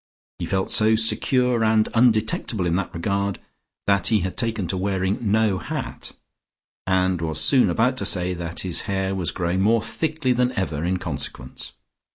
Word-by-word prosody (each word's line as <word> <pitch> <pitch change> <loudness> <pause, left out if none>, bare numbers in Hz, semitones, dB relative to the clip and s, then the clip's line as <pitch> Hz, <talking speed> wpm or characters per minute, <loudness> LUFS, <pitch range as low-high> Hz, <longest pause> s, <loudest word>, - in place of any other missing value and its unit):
He - - -3
felt 95 0 -1
so 110 +1 +5
secure 115 +2 +2
and 110 0 +3
undetectable 110 -3 +1
in 85 0 +1
that 95 0 -2
regard 100 +3 -1 0.5
that 100 -2 +2
he 110 -3 +3
had 95 +1 -3
taken 110 -4 -1
to - - -1
wearing 95 0 -1
no 110 -3 +2
hat, - - -5 0.7
and 95 -2 +1
was 80 -1 -2
soon 130 -8 +4
about 125 +8 +1
to - - -2
say 90 -1 +1
that 85 -1 -5
his 90 -2 0
hair 95 0 -1
was 90 -4 -1
growing 90 +1 -1
more 110 +2 +3
thickly 155 +1 -1
than 125 +1 +1
ever 85 -9 -2
in 90 +2 0
consequence. - - -5
100 Hz, 170 wpm, -23 LUFS, 90-115 Hz, 0.7 s, so